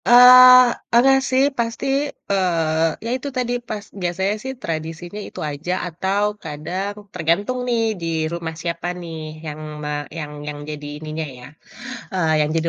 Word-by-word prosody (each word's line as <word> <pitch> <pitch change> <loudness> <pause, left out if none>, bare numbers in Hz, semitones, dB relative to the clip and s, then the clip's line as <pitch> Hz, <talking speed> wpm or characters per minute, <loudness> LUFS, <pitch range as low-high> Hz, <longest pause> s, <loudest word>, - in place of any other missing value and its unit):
Eee, 250 0 +9 0.2
pernah 260 +3 +6
sih 260 +1 +3
pasti, 230 -1 -2 0.5
eee, 165 -4 +2 0.2
ya - - -2
itu 275 - -7
tadi 245 -1 0 0.2
pas 210 -1 -5 0.2
biasanya 190 +3 0
sih 265 0 -4
tradisinya 165 +3 -5
itu - - -10
aja 160 +5 -3
atau 190 +4 -1 0.2
kadang 180 +7 -4 0.2
tergantung 200 +10 0
nih 235 -1 +2 0.2
di 165 - -3 0.3
rumah 165 -1 -4
siapa 170 0 -3
nih 165 -2 -7 0.3
yang 150 0 -6 0.2
me 150 - -3 0.3
yang 150 -2 -5 0.2
yang 145 0 -5
jadi 150 -1 -6
ininya 155 +1 -5
ya, 125 - -11 0.7
eee, 170 -4 +1
yang 150 0 +1
jadi 165 +1 +1
175 Hz, 150 wpm, -21 LUFS, 160-230 Hz, 0.7 s, Eee